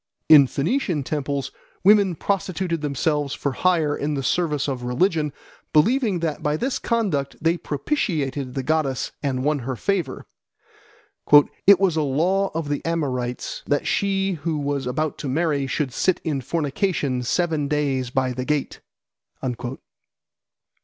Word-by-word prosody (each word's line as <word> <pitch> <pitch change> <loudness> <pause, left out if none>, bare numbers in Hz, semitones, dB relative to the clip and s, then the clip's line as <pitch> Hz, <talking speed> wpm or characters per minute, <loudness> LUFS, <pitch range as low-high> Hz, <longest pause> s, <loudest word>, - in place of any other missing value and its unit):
In 145 -4 +8
Phoenician 170 - -1
temples 140 -1 -3 0.3
women 200 -2 +5
prostituted 185 -3 -2
themselves 145 0 -1
for 140 - -2
hire 160 -1 +1
in 145 +1 -2
the 135 - -3
service 150 0 0
of 130 -3 -3
religion, 150 +5 +1 0.4
believing 210 - +3
that 160 -3 -2
by 150 +1 0
this 260 +9 -1
conduct 190 - -1
they 165 +1 +2
propitiated 145 - -2
the 135 - -2
goddess 150 -2 0
and 130 -3 -1
won 150 0 +1
her 130 +1 -4
favour. 175 - -2 1.4
"It 200 -2 +8
was 185 -5 +2
a - - +3
law 175 +8 +1
of 165 -2 -2
the 145 0 -2
Amorites, 130 -7 -2
that 145 -1 +1
she 195 -1 +1
who 165 -2 -1
was 140 -2 -2
about 155 +4 -2
to 140 - -4
marry 145 -1 0
should 135 0 -2
sit 185 - +1
in 145 -4 -1
fornication 145 - -1
seven 155 +3 0
days 140 -4 0
by 130 0 0
the 125 +1 -3
gate." 150 +1 -2
150 Hz, 140 wpm, -23 LUFS, 135-175 Hz, 1.4 s, In